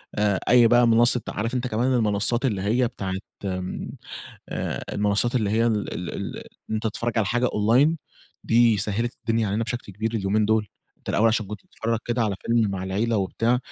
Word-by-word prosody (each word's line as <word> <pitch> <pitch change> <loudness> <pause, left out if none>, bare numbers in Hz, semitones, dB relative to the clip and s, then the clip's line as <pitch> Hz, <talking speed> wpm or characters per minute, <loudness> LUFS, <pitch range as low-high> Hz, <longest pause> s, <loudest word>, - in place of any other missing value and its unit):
آآ 105 -2 +1
أي 120 -1 +7
بقى 120 +1 +5
منصة 120 +1 +4
عارف 115 +4 -3
أنت 125 0 -1
كمان 125 +3 0
المنصات 115 +2 +1
اللي 105 -7 0
هي 115 +5 +2
بتاعة 95 -5 -5 0.3
آمم، 90 -1 -4 1.0
المنصات 105 +4 +1
اللي 110 -5 +1
هي 115 +2 +2
ال 110 -3 -1
ال 90 - -5
ال - - -5 0.3
إن 110 - -1
أنت 110 - -2
تتفرج 115 +2 -2
على 105 - +2
حاجة 120 +4 +1
Online 125 +9 +3 0.5
دي 115 -1 +4
سهلت 110 +4 -1
الدنيا 115 -1 0
علينا 105 +4 0
بشكل 120 -2 -5
كبير 110 +4 -3
اليومين 105 0 +1
دول. 110 -1 +1 0.3
أنت - - -15
الأول 115 +3 +3
عشان 110 -1 0
كنت 105 0 -7
بتتفرج 115 0 -2
كده 120 0 0
على 105 -3 0
فيلم 115 -3 +2
مع 95 -1 -4
العيلة 110 +5 0
وبتاع 115 +5 +1
110 Hz, 190 wpm, -24 LUFS, 105-120 Hz, 1.0 s, أي